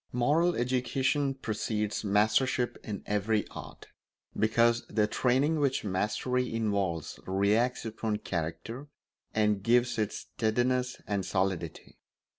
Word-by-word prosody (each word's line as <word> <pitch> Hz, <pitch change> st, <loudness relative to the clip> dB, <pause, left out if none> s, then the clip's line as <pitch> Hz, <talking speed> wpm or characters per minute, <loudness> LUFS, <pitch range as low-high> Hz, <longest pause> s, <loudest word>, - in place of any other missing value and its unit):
Moral 155 Hz, +8 st, +3 dB
education 130 Hz, +3 st, 0 dB
precedes 105 Hz, -4 st, -2 dB
mastership 110 Hz, +5 st, +2 dB
in 105 Hz, -3 st, -5 dB
every 105 Hz, +1 st, 0 dB
art, -, -, -10 dB, 0.5 s
because 115 Hz, +2 st, +3 dB
the 105 Hz, -1 st, +2 dB
training 135 Hz, +8 st, +2 dB
which 140 Hz, -2 st, +1 dB
mastery 105 Hz, +6 st, -1 dB
involves 100 Hz, -8 st, -1 dB
reacts 105 Hz, +6 st, +1 dB
upon 110 Hz, -1 st, -2 dB
character 100 Hz, -, -4 dB, 0.5 s
and 105 Hz, -2 st, +2 dB
gives 120 Hz, +2 st, +2 dB
it 105 Hz, -1 st, 0 dB
steadiness 125 Hz, +3 st, -1 dB
and 100 Hz, -2 st, -1 dB
solidity. 95 Hz, -4 st, -2 dB
110 Hz, 105 wpm, -30 LUFS, 105-125 Hz, 0.5 s, Moral